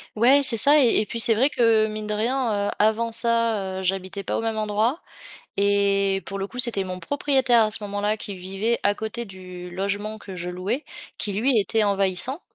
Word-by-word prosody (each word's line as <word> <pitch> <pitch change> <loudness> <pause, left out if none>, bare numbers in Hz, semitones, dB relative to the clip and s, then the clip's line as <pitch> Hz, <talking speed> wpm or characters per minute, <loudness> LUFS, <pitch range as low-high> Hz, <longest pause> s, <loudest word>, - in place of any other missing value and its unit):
Ouais, 260 +6 +4
c'est 240 -4 +6
ça 290 +7 +6
et 245 -5 +3
et 215 - -5
puis 230 - -3
c'est 230 0 +8
vrai 250 +6 +1
que, 225 -5 +2
mine 215 0 -7
de 210 - -3
rien, 220 -2 -1
heu, - - -3
avant 220 +2 0
ça, 225 -5 -1
heu, - - -6
j'habitais 190 +1 -3
pas - - -3
au - - -3
même 225 -1 -3
endroit 215 +7 -1 0.6
et 200 -1 +1
pour 195 - -6
le 195 - -4
coup, 250 - -11
c'était 235 -5 +6
mon 185 -1 -7
propriétaire 265 - +1
à 215 - 0
ce 215 - +1
moment-là 205 +1 -2
qui 205 -2 -8
vivait 195 +6 -3
à 205 0 +1
côté 220 +2 -6
du 185 -3 -11
logement 205 +3 -4
que 195 -3 -11
je 180 0 -6
louais, 195 - -4 0.3
qui 205 - -3
lui, 235 +5 0
était 215 +2 -1
envahissant 200 - 0
215 Hz, 210 wpm, -22 LUFS, 195-230 Hz, 0.6 s, c'est